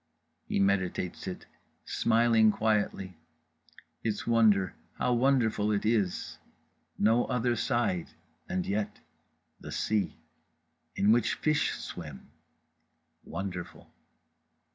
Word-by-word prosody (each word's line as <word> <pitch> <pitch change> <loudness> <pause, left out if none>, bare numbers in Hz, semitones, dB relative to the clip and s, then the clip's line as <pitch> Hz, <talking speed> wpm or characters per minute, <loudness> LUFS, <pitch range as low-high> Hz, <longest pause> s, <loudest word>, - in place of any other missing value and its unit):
—He - - 0
meditates 95 -2 0
it, - - -6 0.4
smiling 115 -1 +4
quietly; 100 -5 -1 0.8
its 110 -2 -2
wonder, 110 -6 +4 0.2
how 125 - 0
wonderful 120 -4 +2
it 100 0 0
is, 105 -5 0 0.6
no 115 +3 +3
other 120 -1 0
side, 115 - 0 0.4
and 90 -1 -1
yet—the 105 +1 -7
sea. 110 -2 -1 0.8
In 105 - +3
which 115 -1 +3
fish 155 -1 +1
swim. 75 -6 -8 0.9
Wonderful. 90 -3 -6
105 Hz, 90 wpm, -29 LUFS, 95-115 Hz, 0.9 s, smiling